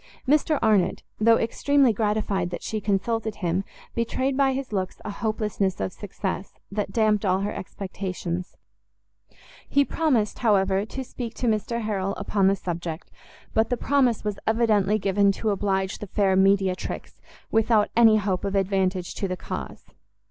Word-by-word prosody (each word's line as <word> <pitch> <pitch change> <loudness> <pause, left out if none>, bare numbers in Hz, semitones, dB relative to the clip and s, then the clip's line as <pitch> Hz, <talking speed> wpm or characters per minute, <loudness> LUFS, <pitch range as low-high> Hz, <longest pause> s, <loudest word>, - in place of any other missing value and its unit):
Mr 300 +2 +3
Arnott, 210 -5 +2 0.2
though 225 +1 +5
extremely 270 +2 +2
gratified 210 -4 0
that 175 - -6
she 215 -1 -3
consulted 220 +2 -1
him, 180 0 -1 0.3
betrayed 260 +3 -1
by 270 0 +3
his 265 -3 -4
looks 185 -2 -2
a 210 - -3
hopelessness 210 -3 -1
of 185 - -2
success, 195 -2 -5 0.2
that 200 -1 -2
damped 215 -2 +2
all 190 -1 +2
her 205 +1 -2
expectations. 185 -2 -5 1.1
He 280 0 +4
promised, 260 -12 0
however, 195 -3 +2
to 265 +4 -5
speak 235 -2 -7
to - - -3
Mr 230 +2 0
Harrel 195 -2 -1
upon 195 -2 +1
the 195 - +4
subject, 170 -3 -5 0.4
but 220 0 +2
the 245 - 0
promise 255 -3 +2
was 210 -2 -3
evidently 215 -2 +3
given 200 0 +3
to 215 +2 -1
oblige 195 -1 -1
the 210 - -6
fair 195 -1 +2
mediatrix, 190 -1 +1 0.3
without 220 -1 +3
any 225 -2 +7
hope 195 -3 -1
of 200 0 -2
advantage 190 -2 0
to 195 - -2
the 185 -1 -3
cause. - - -6
205 Hz, 155 wpm, -25 LUFS, 190-225 Hz, 1.1 s, any